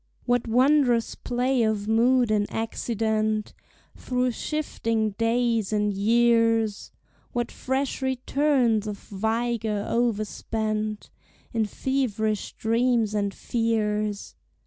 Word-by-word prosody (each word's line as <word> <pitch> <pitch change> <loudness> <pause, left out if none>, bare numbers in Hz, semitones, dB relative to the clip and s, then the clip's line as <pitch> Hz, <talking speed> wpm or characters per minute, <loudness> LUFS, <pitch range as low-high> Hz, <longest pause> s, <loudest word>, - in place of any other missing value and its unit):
What 245 -1 +1
wondrous 250 0 +3
play 250 +1 0
of 215 -2 0
mood 240 +1 +3
and 205 -1 +1
accident 220 -1 -1 0.4
Through 250 0 -1
shifting 230 -6 -2
days 230 0 0
and 210 -1 +1
years; 225 0 +2 0.4
What 240 -1 -2
fresh 265 +1 -2
returns 260 -4 +1
of 205 -1 -4
vigor 220 0 -2
overspent 215 -1 -2 0.4
In 225 -2 +1
feverish 220 -5 -1
dreams 230 -1 +1
and 200 -1 0
fears! 215 -2 -1
225 Hz, 95 wpm, -25 LUFS, 215-245 Hz, 0.4 s, wondrous